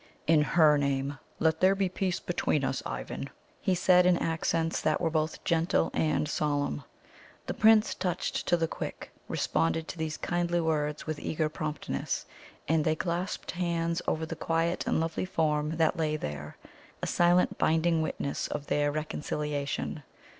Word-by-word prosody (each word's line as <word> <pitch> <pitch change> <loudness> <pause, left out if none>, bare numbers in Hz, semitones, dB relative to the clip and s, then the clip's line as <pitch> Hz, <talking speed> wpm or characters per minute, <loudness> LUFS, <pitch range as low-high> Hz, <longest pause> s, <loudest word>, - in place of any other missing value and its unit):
"In 155 -1 +5
HER 150 0 +5
name, 140 0 -1 0.2
let 160 0 +2
there 190 +1 +5
be 195 -1 +1
peace 185 0 -1
between 155 -4 0
us, 135 0 -1
Ivan," - - -5 0.3
he 185 - +1
said 180 0 +5
in 180 -1 +5
accents 165 0 0
that 155 - +1
were 165 -2 0
both 155 0 -1
gentle 165 +1 +1
and 155 -1 +1
solemn. 145 - -1 0.6
The - - -3
Prince, 220 0 +5
touched 180 -1 -2
to 175 - +4
the 165 -1 0
quick, - - -6 0.2
responded 85 - 0
to 170 - -7
these 160 -1 -2
kindly 175 0 0
words 150 -2 -1
with 155 -1 -3
eager 155 -1 -1
promptness, 150 - -3 0.4
and 160 0 +3
they 155 +1 +2
clasped 175 +3 -3
hands 170 -1 -1
over 160 0 0
the 165 - -5
quiet 165 +2 0
and - - +2
lovely 165 +2 -1
form 155 -3 0
that 165 +2 +2
lay 155 -1 0
there 75 - -6 0.5
a - - +2
silent, 175 +1 +3
binding 165 +1 +3
witness 140 -2 -2
of 145 -1 -4
their 145 0 +1
reconciliation. 150 -1 -3
160 Hz, 160 wpm, -29 LUFS, 150-170 Hz, 0.6 s, In